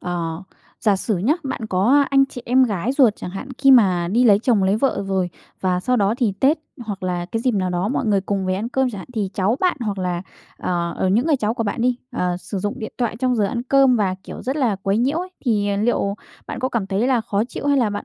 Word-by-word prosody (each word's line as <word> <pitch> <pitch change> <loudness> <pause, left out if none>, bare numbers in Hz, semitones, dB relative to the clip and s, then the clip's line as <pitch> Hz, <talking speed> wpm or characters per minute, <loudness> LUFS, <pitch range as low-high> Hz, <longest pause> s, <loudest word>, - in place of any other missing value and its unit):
ờ, 170 -1 -3 0.4
giả 210 -3 +3
sử 205 +2 -1
nhá, 235 - +2
bạn 265 -5 -4
có 220 +10 +3
anh 275 0 +5
chị 245 -2 -9
em 255 +2 +4
gái 210 +1 -1
ruột 255 -7 +4
chẳng - - -7
hạn 195 +8 -7
khi 275 -1 +5
mà 185 -9 +5
đi 235 +7 +2
lấy 205 -4 +6
chồng 225 -2 +2
lấy 190 +2 +2
vợ 265 -2 0
rồi 190 -2 0 0.3
và 180 -1 0
sau 250 +6 +1
đó 205 -1 +2
thì 230 -6 +1
Tết 290 +5 +4 0.3
hoặc 205 -3 -6
là 180 -1 -2
cái 225 - -1
dịp 255 - +2
nào 185 -2 0
đó 180 +3 -1
mọi 255 - -1
người 205 -2 +3
cùng 195 0 -2
về 185 - +1
ăn 210 +5 -3
cơm 265 0 0
chẳng 205 - -7
hạn, 185 - -9
thì 205 -4 -1
cháu 200 +5 +1
bạn 365 -3 +2
hoặc 210 -4 -2
là, 180 -1 -2 0.3
ờ, 170 -1 -2
ở 190 - 0
những 225 +9 +2
người 310 -3 +3
cháu 220 -3 -1
của 230 - -2
bạn 215 +1 -3
đi, 250 0 +2 0.2
ờ, 180 -6 -1
sử 195 +2 -5
dụng 205 +7 -3
điện 220 -3 -6
thoại 240 -2 -1
trong 250 +1 +1
giờ 210 - +2
ăn 235 +4 -2
cơm 270 0 +4
và, 195 -4 +1
kiểu, - - -8
rất 265 +4 -2
là 245 -9 +1
quấy 195 +2 +1
nhiễu 270 +7 +1
ấy. 365 +1 -4 0.2
Thì, 210 -5 +1
à, 200 - 0
liệu 200 -2 0 0.3
bạn - - -5
có 260 - 0
cảm 235 -6 -2
thấy 195 +4 0
là 255 -3 +2
khó 215 -2 -1
chịu, 255 - -6
hay 285 -1 +3
là 230 -5 +2
bạn 205 0 -4
215 Hz, 275 wpm, -21 LUFS, 190-250 Hz, 0.4 s, lấy